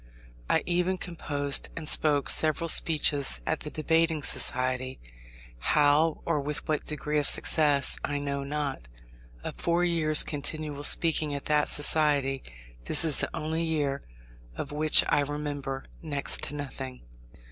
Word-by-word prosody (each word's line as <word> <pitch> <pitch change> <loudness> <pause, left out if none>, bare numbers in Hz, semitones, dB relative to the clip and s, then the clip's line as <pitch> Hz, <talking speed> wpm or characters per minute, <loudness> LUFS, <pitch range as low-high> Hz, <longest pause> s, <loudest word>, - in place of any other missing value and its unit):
I - - +2
even 180 +1 0
composed 145 -5 -2
and 160 -2 -6
spoke 150 -2 +2
several 155 +1 +2
speeches 150 -3 +2
at 160 - -1
the 150 - -5
debating 160 0 0
society, 130 0 +2 0.6
how, 150 - +2
or 160 -3 0
with 145 +1 -4
what 155 -1 -2
degree 150 0 -2
of 145 - 0
success, 145 -3 +3
I 145 - -2
know 140 -1 -3
not. 140 - -4 0.6
Of - - -6
four 170 +1 0
years' 160 -3 +3
continual 145 0 -4
speaking 155 -3 +2
at 140 - -6
that 150 -1 +1
society, 145 -3 +2 0.4
this 165 - +5
is 155 -3 -1
the - - -1
only 160 +2 -3
year 150 -4 -2 0.5
of 140 - -6
which 155 +1 +3
I - - +2
remember 145 -2 -4 0.2
next 145 -4 -2
to 145 - -4
nothing. 135 -3 -7
150 Hz, 140 wpm, -27 LUFS, 140-155 Hz, 0.6 s, this